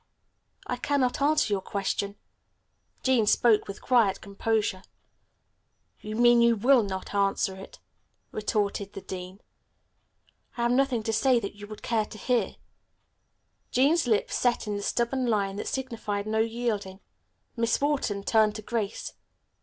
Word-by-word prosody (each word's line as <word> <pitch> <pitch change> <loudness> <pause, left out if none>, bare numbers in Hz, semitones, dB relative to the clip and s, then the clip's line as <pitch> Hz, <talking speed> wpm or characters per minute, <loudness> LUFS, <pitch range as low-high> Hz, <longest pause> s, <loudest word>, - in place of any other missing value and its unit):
"I 250 - -3
cannot 275 0 0
answer 295 -6 +3
your 195 - 0
question," 200 +1 -2 0.9
Jean 250 -5 +3
spoke 220 0 +4
with 200 - -8
quiet 230 -7 +3
composure. 200 -1 -1 1.2
"You 215 +1 -6
mean 240 0 +5
you 235 0 +5
will 245 +4 +5
not 190 -2 -5
answer 195 -1 +1
it," 190 +1 -11 0.5
retorted 205 -2 -2
the 195 - -7
dean. 185 +2 -8 1.2
"I 235 - -1
have 240 - +2
nothing 255 -3 +2
to 225 - -1
say 255 +1 +3
that 200 - -5
you 205 0 -11
would 215 0 -10
care 225 -2 +1
to 215 - -11
hear." 245 +1 0 1.1
Jean's 285 +4 +3
lips 215 -3 +1
set 245 -1 +1
in 210 -1 -2
the 205 - -3
stubborn 245 +4 0
line 200 -3 0
that - - -4
signified 225 -6 -3
no 220 0 0
yielding. 225 -4 -2 0.6
Miss 230 -1 +1
Wharton 275 -9 0
turned 215 0 +3
to 215 - -7
Grace. 215 -3 -3
220 Hz, 145 wpm, -27 LUFS, 200-245 Hz, 1.2 s, mean